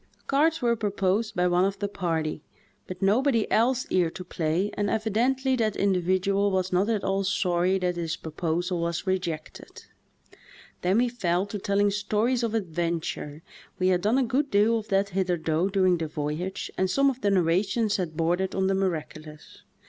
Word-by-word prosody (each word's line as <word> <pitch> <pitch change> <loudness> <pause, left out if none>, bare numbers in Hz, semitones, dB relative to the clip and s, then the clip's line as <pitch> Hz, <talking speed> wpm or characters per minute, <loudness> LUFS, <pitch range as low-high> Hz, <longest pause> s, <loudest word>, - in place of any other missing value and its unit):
Cards 305 +2 +2
were 235 -1 +3
proposed 205 0 -1
by 180 -1 +2
one 180 0 +3
of 195 +1 0
the 205 +1 -2
party, 165 -6 -2 0.5
but 185 +1 -6
nobody 230 +3 +3
else 250 +3 +2
cared 175 -3 0
to 185 - -6
play 175 +3 -1
and 205 -1 -1
evidently 245 +5 +1
that 220 -4 0
individual 195 +1 +1
was 185 -1 -1
not 190 +4 +2
at 215 -3 0
all 195 0 0
sorry 185 -1 +1
that 180 -1 -1
his 165 -1 -2
proposal 170 +3 -2
was 170 +2 -2
rejected. 175 -5 -4 1.0
Then 185 +3 +2
we 245 +1 +3
fell 185 -6 0
to 205 0 -6
telling 200 +1 +1
stories 215 +5 0
of 230 -2 -1
adventure; 165 -5 -3 0.3
we 185 0 +2
had 180 -1 +2
done 215 +6 +2
a 270 - +3
good 270 +4 0
deal 220 +2 +3
of 215 - -10
that 195 0 +1
hitherto 175 -2 0
during 185 -3 +2
the 160 - -2
voyage 155 +4 -4
and 190 0 +2
some 275 +7 +3
of 260 - -10
the 205 - +2
narra 180 -2 +3
tions 215 +1 0
had 165 -5 -4
bordered 175 +3 0
on 190 - +1
the 195 - +2
miraculous. 155 -5 -4
190 Hz, 180 wpm, -26 LUFS, 175-215 Hz, 1.0 s, were